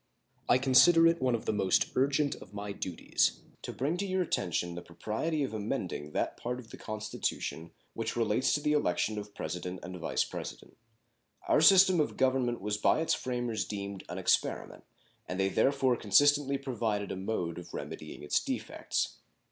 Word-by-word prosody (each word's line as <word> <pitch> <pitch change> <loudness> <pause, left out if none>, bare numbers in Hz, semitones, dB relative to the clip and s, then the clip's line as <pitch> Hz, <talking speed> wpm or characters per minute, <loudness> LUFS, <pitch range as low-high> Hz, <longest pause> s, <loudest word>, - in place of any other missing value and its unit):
I - - +6
consider 135 +6 +6
it 165 0 +3
one 130 -2 +2
of 115 - -5
the - - 0
most 95 -3 +2
urgent 140 +2 +2
of 100 - -13
my 100 0 -4
duties 90 -3 -1 0.2
to - - -5
bring 150 +7 -1
to 200 - -2
your 185 -1 +1
attention 85 - -1
the 85 - -6
propriety 110 - -3
of 130 - -3
amending 100 -8 -3
that - - -1
part 125 +1 -3
of 115 - -13
the - - -9
Constitution 110 -6 -4 0.2
which 115 - -3
relates 115 +2 +1
to 150 - +1
the 150 +1 +1
election 110 -5 +1
of 105 0 -10
President 90 +3 -5
and 90 +2 -7
Vice 80 - 0
President. - - -8 0.7
Our 150 - +4
system 185 +1 +7
of 150 - 0
government 130 -2 +1
was 105 +1 -1
by 105 - +3
its 165 - +1
framers 120 -3 -2
deemed 100 -2 -6
an - - -5
experiment, - - 0 0.4
and 90 - -4
they 95 0 +2
therefore 135 +3 +2
consistently 140 +6 +3
provided 115 -7 -2
a - - -3
mode 95 -4 -3
of 90 - -11
remedying - - -7
its 75 - +1
defects. - - -3
115 Hz, 175 wpm, -30 LUFS, 100-140 Hz, 0.7 s, system